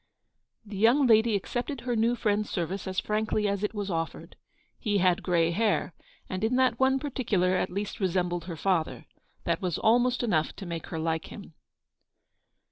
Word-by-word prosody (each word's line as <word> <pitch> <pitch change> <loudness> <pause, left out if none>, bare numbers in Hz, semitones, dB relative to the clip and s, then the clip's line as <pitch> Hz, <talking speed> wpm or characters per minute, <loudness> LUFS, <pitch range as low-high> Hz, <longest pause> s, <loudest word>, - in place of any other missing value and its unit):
The 205 -1 -7
young 240 +7 +4
lady 225 -1 +4
accepted 245 +6 -3
her 245 -1 -2
new 230 +2 +2
friend's 210 -2 0
service 185 +2 -3
as 185 0 -1
frankly 215 0 0
as 200 0 -1
it 210 +1 -2
was 200 -1 -3
offered. 165 -1 -4 0.4
He 205 -4 0
had 180 -2 +3
grey 170 -2 +2
hair, 210 -2 0 0.3
and 185 +2 -4
in 225 +3 +2
that 255 0 +2
one 265 0 +4
particular 230 -10 0
at 185 - 0
least 200 +4 -4
resembled 175 -3 0
her 170 -3 -6
father. 175 -1 -1 0.4
That - - -1
was 180 -4 -1
almost 245 +2 +3
enough 160 -9 0
to 195 - -8
make 170 -2 -5
her 165 - -5
like 160 0 -2
him. 195 -5 -11
205 Hz, 175 wpm, -28 LUFS, 180-230 Hz, 0.4 s, young